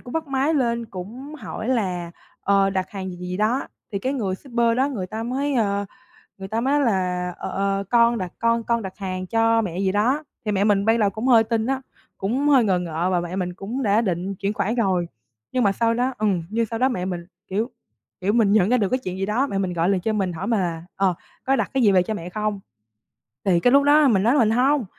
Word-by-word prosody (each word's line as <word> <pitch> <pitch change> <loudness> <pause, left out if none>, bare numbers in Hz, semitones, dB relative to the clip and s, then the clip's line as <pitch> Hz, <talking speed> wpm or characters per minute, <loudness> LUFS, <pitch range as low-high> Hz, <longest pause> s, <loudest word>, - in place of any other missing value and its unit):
cũng 245 - -10
bắt 325 -1 -2
máy 275 +3 +1
lên 235 -4 0
cũng 230 +9 -8
hỏi 235 -6 -6
là, 185 -9 -1 0.3
ờ, 195 0 +3
đặt 190 -1 -2
hàng 190 -2 -5
gì 180 - -8
gì 180 0 -7
gì 180 - -3
đó? 220 +6 +1 0.3
Thì 200 - -1
cái 260 +7 -2
người 210 -9 -1
shipper 235 0 0
đó 265 +2 +2
người 215 -10 -4
ta 220 +4 -5
mới, 270 +4 -1
ờ, 200 -4 +1 0.5
người 190 0 -7
ta 220 +3 -1
mới 265 +3 +1
nói 290 - +3
là, 180 -4 0
ờ, - - -5
ờ, 195 0 -1
con 235 0 +4
đặt 185 -4 -4
con 230 0 +2
con 235 0 0
đặt 190 -2 -7
hàng 185 -2 -4
cho 225 +2 +3
mẹ 180 -4 -4
gì 190 -1 +1
đó, 245 +10 +1 0.2
thì 210 - 0
mẹ 200 -1 +1
mình 200 -1 +2
ban 225 +1 +3
đầu 205 -2 +3
cũng 220 +5 -4
hơi 235 -3 +6
tin 225 0 -1
á, 265 +1 -1 0.4
cũng 250 +9 0
hơi 270 -4 +6
ngờ 190 -4 +2
ngợ 170 0 -2
và 180 - +2
mẹ 175 +1 -4
mình 180 -2 -2
cũng 220 +9 -4
đã 210 0 +3
định 190 -2 -2
chuyển 200 +2 -2
khoản 220 +2 -1
rồi. 190 -7 +1 0.4
Nhưng 255 - +1
mà 200 - +4
sau 230 +3 +1
đó 250 +3 0
ừm, 200 -5 0
nhưng 230 +2 0
sau 225 +1 -5
đó 260 +2 +3
mẹ 180 -8 -2
mình, 175 -2 -4 0.2
kiểu 215 +6 -1 0.5
kiểu, 200 +3 +1
mình 220 -4 +3
nhận 205 -2 +4
ra 250 - +4
được 205 -5 +1
cái 255 - +1
chuyện 185 0 -4
gì 195 - -1
đó, 235 +7 +1
mẹ 200 - -3
mình 190 -2 -1
gọi 170 +1 +1
liền 195 -2 +1
cho 220 +4 -1
mình 190 -4 -1
hỏi 180 +4 -5
mà 225 -2 +2
là 170 -3 -2
"Ờ, 195 -2 +2 0.3
có 270 - +2
đặt 225 -6 -1
cái 265 -2 +2
gì 205 - +6
về 185 -2 +4
cho 220 - -3
mẹ 175 -4 -6
không?" 210 +1 -2 0.9
Thì 180 -3 +4
cái 245 - +3
lúc 280 0 +6
đó 295 +1 +5
mình 200 -6 +3
nói 235 +4 +4
là 290 - +3
mình 220 -3 +4
hông, 260 +2 +2
210 Hz, 260 wpm, -23 LUFS, 190-240 Hz, 0.9 s, hơi